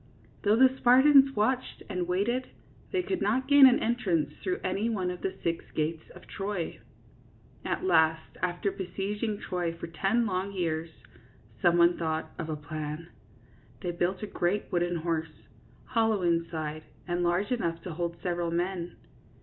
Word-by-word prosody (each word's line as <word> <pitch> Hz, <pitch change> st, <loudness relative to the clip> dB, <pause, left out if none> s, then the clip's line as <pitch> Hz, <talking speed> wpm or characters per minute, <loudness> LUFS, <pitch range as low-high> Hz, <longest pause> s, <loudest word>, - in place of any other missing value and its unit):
Though 210 Hz, 0 st, +3 dB
the 260 Hz, +2 st, +5 dB
Spartans 270 Hz, +2 st, +6 dB
watched 250 Hz, +5 st, 0 dB
and 180 Hz, -4 st, -2 dB
waited, 220 Hz, +8 st, 0 dB, 0.4 s
they 370 Hz, -2 st, 0 dB
could 380 Hz, 0 st, -2 dB
not 255 Hz, +6 st, +1 dB
gain 285 Hz, -1 st, +9 dB
an 255 Hz, -, +5 dB
entrance 175 Hz, -, 0 dB
through 185 Hz, -2 st, -1 dB
any 195 Hz, +5 st, 0 dB
one 185 Hz, -5 st, -1 dB
of 180 Hz, -, -7 dB
the 190 Hz, 0 st, -2 dB
six 170 Hz, -1 st, -1 dB
gates 160 Hz, +1 st, -2 dB
of -, -, -13 dB
Troy. 195 Hz, -3 st, -4 dB, 0.8 s
At -, -, -2 dB
last, 160 Hz, -, +2 dB
after 180 Hz, +2 st, -1 dB
besieging 200 Hz, +3 st, -3 dB
Troy 175 Hz, -3 st, -2 dB
for -, -, -6 dB
ten 195 Hz, +8 st, 0 dB
long 190 Hz, 0 st, -2 dB
years, 165 Hz, -3 st, -2 dB, 0.7 s
some 175 Hz, 0 st, +4 dB
one 170 Hz, 0 st, +5 dB
thought 160 Hz, -1 st, -2 dB
of 160 Hz, -, -4 dB
a 155 Hz, -, -1 dB
plan. 150 Hz, +2 st, -6 dB, 0.7 s
They 175 Hz, -, -2 dB
built 175 Hz, +3 st, -1 dB
a -, -, 0 dB
great 195 Hz, 0 st, -1 dB
wooden 175 Hz, -1 st, +1 dB
horse, 165 Hz, -1 st, -3 dB, 0.4 s
hollow 225 Hz, -5 st, +1 dB
inside, 165 Hz, -2 st, -1 dB, 0.3 s
and 175 Hz, 0 st, -1 dB
large 175 Hz, +6 st, +1 dB
enough 170 Hz, -9 st, -1 dB
to 180 Hz, -, -5 dB
hold 170 Hz, +1 st, -3 dB
several 175 Hz, -1 st, -1 dB
men. 175 Hz, +1 st, -2 dB
180 Hz, 160 wpm, -29 LUFS, 170-215 Hz, 0.8 s, gain